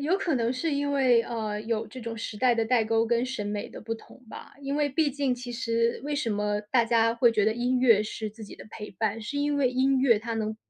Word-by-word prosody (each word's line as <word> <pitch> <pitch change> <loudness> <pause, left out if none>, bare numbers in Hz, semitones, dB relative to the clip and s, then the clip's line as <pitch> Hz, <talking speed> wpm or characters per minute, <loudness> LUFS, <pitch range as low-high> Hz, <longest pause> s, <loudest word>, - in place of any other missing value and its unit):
有 320 +7 +1
可 350 -7 -1
能 235 0 +1
是 300 +4 -2
因 285 0 0
为， 255 -4 +4
呃， 215 -3 -4
有 225 -1 -2
这 255 +4 -10
种 230 -1 -5
时 220 -1 -5
代 250 +1 +3
的 225 -1 +1
代 225 -1 +2
沟 225 +1 +2
跟 235 +1 +1
审 255 -6 -4
美 205 +2 -3
的 - - -10
不 225 +1 -4
同 255 +3 -15
吧。 - - -10
因 275 +1 -2
为 295 -1 +2
毕 290 +1 +1
竟 270 -2 0
其 245 0 -7
实 230 -1 0
为 295 0 -2
什 265 -6 -1
么 210 0 -1
大 240 -3 +4
家 230 0 +2
会 235 0 +4
觉 215 -2 +2
得 220 - +3
音 250 +2 0
乐 225 -5 +5
是 215 0 -5
自 220 +1 -11
己 - - -11
的 - - -12
陪 210 -1 -8
伴， 220 +3 -2
是 225 +7 -5
因 290 0 0
为 265 -3 +2
音 265 +1 +2
乐 235 -5 +4
它 230 +1 -4
能 220 -1 -2
235 Hz, 285 characters per minute, -27 LUFS, 220-260 Hz, -, 乐